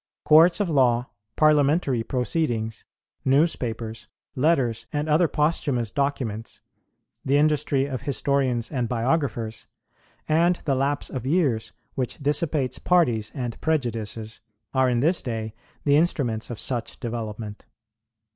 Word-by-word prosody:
Courts 165 +4 +6
of 205 - +1
law, 125 -5 +2 0.2
Parliamentary 150 -3 +3
proceedings, 120 -3 -2 0.4
newspapers, 115 -7 0 0.3
letters 125 -6 +1
and 150 +1 -2
other 160 +3 +4
posthumous 145 -7 0
documents, 125 -5 -2 0.6
the 140 +2 +2
industry 145 -2 +2
of 135 -3 -4
historians 135 -4 0
and 125 -5 -1
biographers, 120 -3 -1 0.6
and 170 +3 +3
the 140 - +2
lapse 140 +2 0
of 130 -1 -4
years 140 -9 +1 0.2
which 125 -3 -3
dissipates 145 -2 0
parties 120 -12 +2
and 125 -4 -4
prejudices, 115 -7 -2 0.3
are 130 -1 +3
in 120 -1 +1
this 165 +5 +2
day 110 -3 -4 0.3
the 145 -1 +4
instruments 135 -9 0
of 120 - -5
such 120 -3 -2
development. 110 -2 -6
130 Hz, 120 wpm, -24 LUFS, 115-150 Hz, 0.6 s, Courts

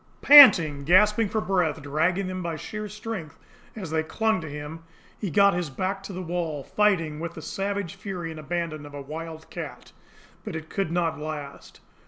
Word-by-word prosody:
Panting, 170 - +8
gasping 210 +6 +4
for 220 - -1
breath, 180 -6 0
dragging 165 +7 0
them 185 0 -4
by 170 -2 -3
sheer 210 +6 -6
strength 210 -7 -7 0.4
as 190 -8 -7
they 160 0 +1
clung 220 +5 0
to 155 - -7
him, 150 +3 -8 0.4
he 205 - -3
got 200 +5 +4
his 175 -3 -2
back 190 +8 -3
to 195 - -8
the 185 0 -6
wall, 165 -4 -3
fighting 165 -7 +1
with 170 0 -5
the 160 - -8
savage 195 +1 -3
fury 180 -5 -6
and 160 - -9
abandon 155 -1 -4
of 145 - -12
a 145 - -6
wild 160 +2 -8
cat. - - -8 0.5
But 210 -6 -6
it 160 0 -7
could 195 -5 -2
not 165 -3 -1
last. 150 -2 -8
170 Hz, 185 wpm, -25 LUFS, 155-195 Hz, 0.5 s, Panting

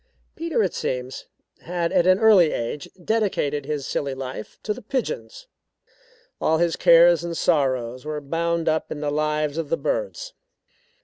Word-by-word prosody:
Peter, 325 -8 0
it 185 - -1
seems, 125 +1 -4 0.3
had 170 -1 -2
at 175 - +3
an 185 0 +6
early 200 -7 +5
age 120 +5 -4 0.2
dedicated 165 -10 0
his 150 -3 -3
silly 140 -2 -2
life 130 -4 -7
to 210 - -1
the - - -10
pigeons. 475 - -4 1.0
All 160 - +2
his 170 0 +1
cares 170 0 +6
and 170 -1 -4
sorrows 130 -6 0
were 150 0 -4
bound 165 +3 -1
up 160 0 0
in 150 - -5
the 145 -1 -1
lives 150 0 -1
of 160 -3 -4
the 165 - +1
birds. - - -3
165 Hz, 160 wpm, -23 LUFS, 145-185 Hz, 1.0 s, an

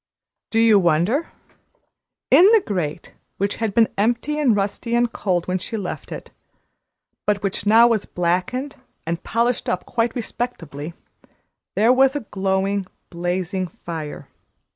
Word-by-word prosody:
Do 225 - -1
you 225 -2 +6
wonder? 175 - +2 1.0
In 360 - +8
the 445 - +5
grate, 170 -5 -3 0.2
which 200 +1 -1
had 225 -3 -2
been 230 -1 +5
empty 240 +8 +1
and 255 -8 +3
rusty 205 +4 -1
and 240 -1 +2
cold 180 -4 -1
when 185 0 0
she 225 +5 -5
left 195 -4 -6
it, - - -8 1.0
but 205 -1 +1
which 200 +1 -2
now 225 +3 +7
was 225 -4 +1
blackened 185 +11 -1 0.3
and 170 +1 -2
polished 235 +1 0
up 180 - -2
quite 235 0 -1
respectably, 170 - -5 0.8
there 225 +5 +5
was 265 +1 +4
a 290 - -1
glowing, 195 0 0 0.2
blazing 180 +2 -2
fire. 160 -3 -7
200 Hz, 140 wpm, -22 LUFS, 180-235 Hz, 1.0 s, In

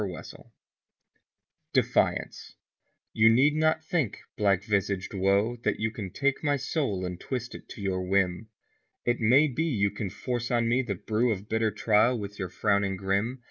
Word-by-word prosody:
March 95 -4 -5
First - - -16 1.4
DEFIANCE - - 0 0.6
\7X)U 110 +1 +6
need 140 +6 +4
not 155 0 +2
think, 160 - -1 0.2
black 100 -2 +2
visaged 100 -2 -1
Woe, 100 +5 +1
that 115 - -2
you 110 0 0
Can 105 -4 -6
take 140 - -1
my 145 -2 +2
soul 135 - -2
and 90 -1 -5
twist 125 -2 -5
it - - -11
to 105 - -8
your 95 -1 -1
whim. 95 +2 0 0.6
It 120 0 +1
may 130 +6 +5
be 150 +4 -1
you 100 -10 +1
can 105 - -4
force 120 +4 -4
on 120 -1 +1
me 120 +3 +2
the 110 -6 -3
brew 110 +6 0
Of 100 -1 -4
bitter 110 0 +1
trial 110 +3 +2
with 105 -1 -7
your 95 -2 -3
frowning 100 0 0
grim. 100 +7 -1
110 Hz, 175 wpm, -27 LUFS, 100-125 Hz, 1.4 s, 7X)U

